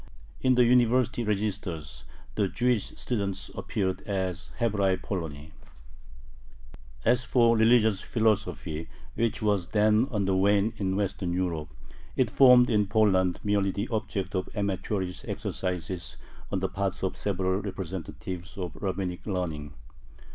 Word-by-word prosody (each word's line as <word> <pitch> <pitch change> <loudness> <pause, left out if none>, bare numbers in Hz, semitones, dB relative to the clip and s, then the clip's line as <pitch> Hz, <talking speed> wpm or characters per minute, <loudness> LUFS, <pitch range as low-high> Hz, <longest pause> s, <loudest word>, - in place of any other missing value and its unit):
In 130 -1 +4
the 125 0 +5
university 120 0 +3
registers 100 -7 -3 0.3
the 105 -2 +1
Jewish 120 +1 +1
students 100 -6 -2
appeared 95 -3 -2
as 95 -4 -2
Hebraei 100 -5 +2
Poloni. 80 -6 -5 1.5
As 120 +2 +3
for 115 -2 +4
religious 110 -3 +4
philosophy, 105 -8 -1 0.2
which 115 -2 -1
was 100 -4 +1
then 105 +4 +3
on 105 -5 -1
the 95 0 +1
wane 100 +3 +3
in 95 -2 -1
Western 95 -3 -1
Europe, 85 -5 -2 0.5
it - - +1
formed 125 -2 +7
in 105 -3 +2
Poland 95 -4 +3
merely 100 -1 +2
the 100 +4 -3
object 100 -4 -2
of 95 -1 -2
amateurish 95 -2 -2
exercises 90 -1 -4 0.3
on 95 - -1
the 95 - +1
part 95 0 -3
of 95 - -1
several 95 -1 -1
representatives 95 -1 -6
of 90 -4 -5
Rabbinic 95 -1 -3
learning. 80 -7 -3
100 Hz, 125 wpm, -28 LUFS, 90-110 Hz, 1.5 s, formed